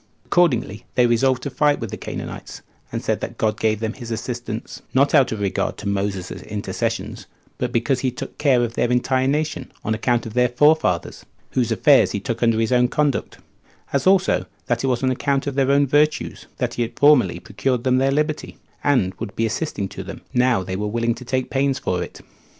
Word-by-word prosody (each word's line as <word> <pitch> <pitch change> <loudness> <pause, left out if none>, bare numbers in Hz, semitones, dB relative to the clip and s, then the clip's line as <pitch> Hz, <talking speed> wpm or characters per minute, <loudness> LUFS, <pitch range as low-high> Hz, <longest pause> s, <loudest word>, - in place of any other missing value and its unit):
Accordingly 125 - +1
they 125 - +5
resolved 125 +2 +2
to 140 - -3
fight 145 +1 +2
with 115 -4 -5
the - - -3
Canaanites, - - -7 0.3
and - - -4
said - - 0
that - - -6
God 110 -1 0
gave 110 -1 +1
them 110 0 -2
his 120 -3 -9
assistance, 115 0 -5
not 140 +2 +4
out 140 -5 +5
of 110 - -3
regard 100 -3 -1
to 105 - -6
Moses's 100 -2 -2
intercessions, 105 -1 -4 0.3
but - - -1
because 120 +3 +1
he 130 - 0
took 125 - -8
care 135 -5 +3
of 115 -1 -2
their 120 - 0
entire 130 +1 +2
nation, 150 +2 -1
on 110 - +1
account 120 +2 0
of 110 - -7
their 125 +1 +3
forefathers, 145 - +2 0.3
whose 120 -3 0
affairs 140 +4 +4
he 100 - -1
took 115 0 -4
under 115 -2 +3
his 115 +2 0
own 125 -1 +4
conduct; 145 +1 -1 0.6
as 140 +5 +1
also, 190 0 +3 0.2
that 120 0 -1
it - - +1
was 125 0 0
on 130 - +3
account 135 +1 0
of 140 - -2
their 135 0 +1
own 140 +1 +4
virtue 150 +3 +2 0.2
that - - -1
he - - -3
had 120 0 -3
formerly 125 - +5
procured 120 +7 -2
them 130 0 +3
their 135 +1 +2
liberty, 150 +2 -1 0.3
and 125 -10 +2
would 100 - -6
be 115 - +1
assisting 115 -3 -2
to 95 - -8
them, 100 - -8
now 125 -6 +3
they 95 +1 -4
were 105 +2 -2
willing 115 +2 0
to 125 - -10
take 130 +1 -2
pains 135 0 +1
for 90 -9 -1
it. - - -7
125 Hz, 210 wpm, -22 LUFS, 110-140 Hz, 0.6 s, they